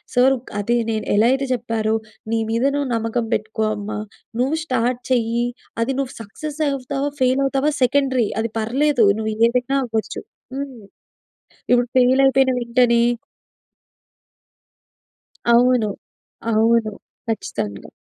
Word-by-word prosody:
Sir 260 Hz, +2 st, +5 dB, 0.3 s
అది 235 Hz, +4 st, +1 dB, 0.2 s
నేను 220 Hz, -1 st, -2 dB
ఎలా 215 Hz, +3 st, +4 dB
అయితే 270 Hz, +1 st, +1 dB
చెప్పారో, 225 Hz, -2 st, -1 dB, 0.4 s
"నీ 230 Hz, -, +2 dB
మీద 230 Hz, +2 st, 0 dB
నువ్వు 285 Hz, -2 st, -1 dB
నమ్మకం 230 Hz, +1 st, -1 dB
పెట్టుకో 220 Hz, +1 st, -2 dB
అమ్మ, 205 Hz, 0 st, -6 dB, 0.5 s
నువ్వు 265 Hz, +5 st, +1 dB
స్టార్ట్ 250 Hz, -2 st, 0 dB
చెయ్యి, 235 Hz, 0 st, +1 dB, 0.4 s
అది 235 Hz, -, +1 dB
నువ్వు 265 Hz, -2 st, -2 dB
సక్సెస్ 300 Hz, +9 st, -7 dB
అవుతావా? 275 Hz, +1 st, -2 dB
ఫెయిల్ 255 Hz, +2 st, +3 dB
అవుతావా? 275 Hz, +2 st, +1 dB
సెకండరీ. 260 Hz, -2 st, +2 dB
అది 225 Hz, -1 st, -3 dB
పర్లేదు. 250 Hz, +2 st, +2 dB
నువ్వు 220 Hz, 0 st, -2 dB
ఏదైనా 250 Hz, +3 st, 0 dB
అవ్వచ్చు." 225 Hz, -2 st, -3 dB, 0.3 s
హ్మ్. 275 Hz, -2 st, -5 dB, 0.9 s
ఇప్పుడు 245 Hz, 0 st, +4 dB
ఫెయిల్ 255 Hz, +1 st, +4 dB
అయిపోయిన 270 Hz, -1 st, +4 dB
వెంటనే 235 Hz, 0 st, +3 dB, 2.5 s
అవును. 245 Hz, -2 st, +4 dB, 0.6 s
అవును. 225 Hz, 0 st, +3 dB, 0.3 s
ఖచ్చితంగా. 105 Hz, -, -4 dB
245 Hz, 115 wpm, -21 LUFS, 225-265 Hz, 2.5 s, Sir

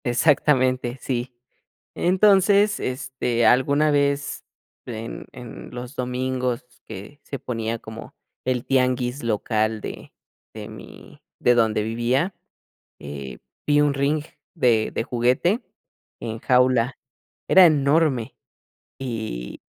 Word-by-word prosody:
Exactamente, 130 Hz, -1 st, +2 dB
sí. 125 Hz, 0 st, -3 dB, 0.6 s
Entonces, 200 Hz, +2 st, +4 dB
este, 125 Hz, -2 st, -1 dB
alguna 140 Hz, +6 st, +4 dB
vez 140 Hz, 0 st, 0 dB, 0.4 s
en 115 Hz, -1 st, -6 dB
en 120 Hz, -2 st, -10 dB
los 125 Hz, +2 st, -7 dB
domingos 125 Hz, -1 st, -2 dB, 0.2 s
que 105 Hz, +10 st, -10 dB
se 140 Hz, -, -6 dB
ponía 115 Hz, -1 st, -3 dB
como 110 Hz, 0 st, -10 dB, 0.3 s
el 125 Hz, -1 st, -1 dB
tianguis 125 Hz, 0 st, +1 dB
local 110 Hz, -1 st, 0 dB
de -, -, -8 dB, 0.4 s
de 110 Hz, 0 st, -8 dB
mi 110 Hz, -, -13 dB, 0.2 s
de 125 Hz, -, +4 dB
donde 110 Hz, -2 st, +2 dB
vivía, 120 Hz, -, 0 dB, 0.7 s
eh, 70 Hz, -3 st, -7 dB, 0.3 s
vi 145 Hz, 0 st, +4 dB
un 145 Hz, -1 st, +3 dB
ring 140 Hz, +2 st, +1 dB, 0.3 s
de 120 Hz, -9 st, +2 dB
de -, -, -1 dB
juguete 125 Hz, -, +1 dB, 0.6 s
en 110 Hz, 0 st, -5 dB
jaula, 125 Hz, 0 st, +3 dB, 0.5 s
era 190 Hz, -1 st, +8 dB
enorme. 145 Hz, -5 st, +2 dB, 0.6 s
Y 110 Hz, -, -5 dB
125 Hz, 105 wpm, -23 LUFS, 115-140 Hz, 0.7 s, era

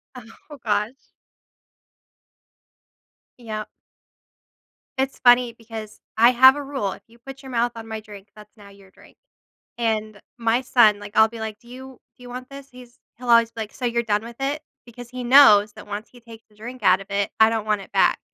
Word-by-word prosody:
Oh, 250 Hz, +5 st, -14 dB
gosh. 210 Hz, +4 st, -3 dB, 2.3 s
Yep. 215 Hz, -3 st, -6 dB, 1.3 s
It's 265 Hz, 0 st, -2 dB
funny 245 Hz, -1 st, +4 dB
because 225 Hz, -2 st, -10 dB, 0.2 s
I 235 Hz, +2 st, +6 dB
have 260 Hz, +2 st, +7 dB
a 290 Hz, -, -5 dB
rule, 270 Hz, -9 st, -3 dB
if -, -, -10 dB
you 230 Hz, +1 st, -21 dB
put 270 Hz, +3 st, -12 dB
your 265 Hz, -, -11 dB
mouth 240 Hz, 0 st, 0 dB
on 225 Hz, -1 st, -9 dB
my 220 Hz, -1 st, -5 dB
drink, 205 Hz, -2 st, -13 dB
that's 210 Hz, 0 st, -16 dB
now 205 Hz, -2 st, -16 dB
your 195 Hz, -1 st, -19 dB
drink. -, -, -21 dB, 0.6 s
And, 215 Hz, -2 st, -2 dB, 0.2 s
my 230 Hz, +1 st, +1 dB
son, 220 Hz, -5 st, +4 dB
like, 205 Hz, +1 st, -11 dB
I'll 220 Hz, 0 st, +6 dB
be 230 Hz, 0 st, -10 dB
like, 220 Hz, -1 st, -6 dB
"Do 235 Hz, -, -23 dB
you 260 Hz, +1 st, -12 dB, 0.2 s
do 250 Hz, -, -16 dB
you 245 Hz, -, -11 dB
want 250 Hz, +1 st, -8 dB
this? 275 Hz, 0 st, -12 dB
He's 250 Hz, -1 st, -16 dB, 0.2 s
he'll 245 Hz, 0 st, -8 dB
always 230 Hz, -1 st, +5 dB
be 225 Hz, -, -7 dB
like, 215 Hz, -, -7 dB
"So 250 Hz, -, -5 dB
you're 235 Hz, 0 st, 0 dB
done 210 Hz, -1 st, -1 dB
with 235 Hz, 0 st, -10 dB
it? 285 Hz, +3 st, -2 dB, 0.2 s
Because 240 Hz, 0 st, -12 dB
he 255 Hz, 0 st, -7 dB
knows 220 Hz, -5 st, +6 dB
that -, -, -13 dB
once 205 Hz, +2 st, -7 dB
he 245 Hz, -, -18 dB
takes 230 Hz, -1 st, -14 dB
the 210 Hz, -, -27 dB
drink 240 Hz, +2 st, -10 dB
out 185 Hz, 0 st, +4 dB
of 195 Hz, -, -12 dB
it, 200 Hz, 0 st, -1 dB
I 220 Hz, 0 st, +6 dB
don't 225 Hz, -2 st, -3 dB
want 210 Hz, -2 st, 0 dB
it -, -, -14 dB
back. -, -, +3 dB
230 Hz, 205 wpm, -22 LUFS, 215-250 Hz, 2.3 s, have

